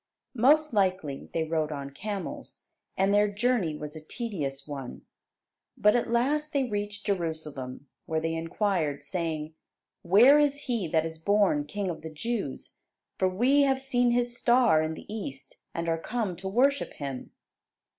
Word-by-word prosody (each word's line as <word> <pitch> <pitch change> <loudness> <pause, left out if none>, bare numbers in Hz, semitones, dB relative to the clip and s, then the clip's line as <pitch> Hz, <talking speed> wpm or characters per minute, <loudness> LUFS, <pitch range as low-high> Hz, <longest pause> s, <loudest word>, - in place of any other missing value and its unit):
Most 290 +4 +4
likely 185 -9 0
they 165 - 0
rode 160 -1 -1
on 140 -1 -5
camels, 200 +6 -6 0.3
and 195 +1 +3
their 205 0 +5
journey 205 -5 0
was 150 +1 -7
a 155 - -9
tedious 155 - -4
one. 135 -4 -7 0.7
But 210 +2 +4
at 240 - 0
last 290 +6 +1
they 280 -2 +2
reached 205 -3 -4
Jerusalem, 155 -9 -3 0.2
where 160 -2 0
they 165 +1 -2
inquired 165 -3 -1
saying, 160 -1 -3 0.5
"Where 235 +11 +7
is 290 -1 +2
He 235 -10 -1
that 160 0 +1
is 160 0 -5
born 200 -5 +2
King 200 +6 -3
of 160 - -8
the 160 - -6
Jews? 195 - -4 0.4
for 190 - +3
we 250 +10 +3
have 270 -1 +3
seen 245 -2 +1
His 240 0 +1
star 240 -9 +4
in 155 0 -2
the - - -11
East 135 -11 -7
and 170 0 -4
are 165 0 +1
come 215 -1 -2
to 190 - -6
worship 265 +8 +2
Him." 135 -3 -6
190 Hz, 160 wpm, -28 LUFS, 155-240 Hz, 0.7 s, Where